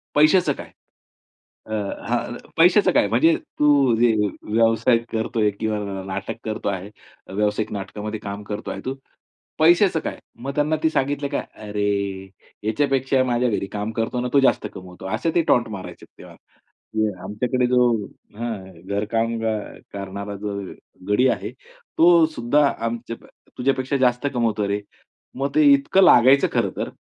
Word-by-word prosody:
पैशाचं 155 +1 +4
काय? - - -10 1.0
अ, 110 - -6 0.4
हां, - - -1 0.2
पैशाचं 180 +5 +5
काय 295 - +4
म्हणजे 330 +1 +4 0.2
तू 150 - +4 0.3
जे 120 -1 +5 0.4
व्यावसायिक 115 +1 +3
करतोय 110 -1 0
किंवा 110 -1 -1 0.3
नाटक 95 +2 -4
करतो 110 -2 -2
आहे. 95 0 -4 0.5
व्यावसायिक 105 +1 0
नाटकामध्ये 105 +2 -5
काम 100 0 -6
करतो 105 +2 -5
आहे - - -6
तू, 130 +1 -3 0.6
पैशाचं 170 +2 +5
काय?" - - -5 0.2
मग 140 0 -5
त्यांना 150 +1 +1
ते 160 - +4
सांगितलं 140 0 0
का 140 - -1 0.3
"अरे 105 0 0 0.7
याच्यापेक्षा 135 +3 +1
माझ्या 125 0 +1
घरी 100 -2 -2
काम 105 +1 -3
करतो 115 +2 -2
ना, 125 - -1
तो 140 - +6
जास्त 130 -5 +2
कमवतो," 90 0 -11
असे 165 +9 -1
ते 170 - +5
टॉन्ट 120 - +3
मारायचे 95 - -9
तेव्हा. - - -13 0.9
आमच्याकडे 125 +6 -1
जो 125 0 +3 0.6
हां, 115 -3 -4 0.3
घरकाम 115 +3 -1 0.6
करणारा 100 +1 -6
जो 105 -1 -3 0.6
गडी 125 +6 +4
आहे, 105 0 -2
तो 165 +6 +2
सुद्धा 145 +5 +2 0.2
आमच्या 115 0 -4 0.4
तुझ्यापेक्षा 130 +1 0
जास्त 125 +2 +2
कमवतो 110 -4 0
रे. 100 +1 -1 0.5
मग 135 +2 -1
ते 310 - +5
इतकं 275 -8 +3
लागायचं 135 -3 +6
खरंतर. - - -1
120 Hz, 140 wpm, -22 LUFS, 105-140 Hz, 1.0 s, तो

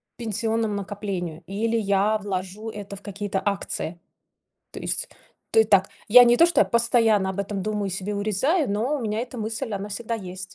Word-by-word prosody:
пенсионному 225 -1 -1
накоплению, 195 -5 -4
или 225 +4 -1
я 205 0 +2
вложу 200 +2 -4
это 200 -2 -7
в 200 - -12
какие-то 200 -1 -3
акции. 195 -4 -3 0.7
То - - -8
есть, - - -2 0.4
ты 220 0 +5
так 195 -2 +3 0.2
я 245 +3 +10
не 240 0 +4
то 335 - +8
что 345 - +4
постоянно 230 -4 +3
об 190 +1 -2
этом 200 0 -3
думаю 210 -2 -2
себе 195 +2 -3
урезаю, 215 - +1
но 235 +9 0
у 260 - -5
меня 215 0 -1
эта 250 0 -6
мысль 225 +2 -3
она 200 +1 -5
всегда 230 +3 -3
есть. 185 -2 -7
210 Hz, 175 wpm, -24 LUFS, 195-225 Hz, 0.7 s, я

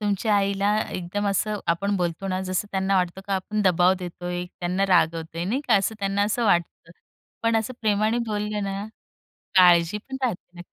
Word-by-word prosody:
तुमच्या 205 +1 +1
आईला 200 +1 +1
एकदम 185 +3 -3
असं 210 +2 0
आपण 200 +4 0
बोलतो 175 +1 -2
ना, 185 0 -1
जसं 185 +2 -2
त्यांना 195 0 +1
वाटतो 180 0 -1
का 195 - 0
आपण 210 +3 -2
दबाव 180 0 +4
देतोय, 175 0 -5
त्यांना 180 +2 -2
रागवतोय 165 -2 +1
नाही 230 +9 -1
का, 230 - +5
असं 195 +3 0
त्यांना 200 0 0
असं 220 +3 0
वाटतं. 170 -4 0 0.5
पण 230 0 +2
असं 220 +3 -1
प्रेमाने 215 +1 +1
बोलले 210 0 -2
ना, 195 0 -3 0.7
काळजी 175 0 +5
पण 265 +5 -8
राहते. 180 -6 -4
195 Hz, 170 wpm, -24 LUFS, 180-210 Hz, 0.7 s, का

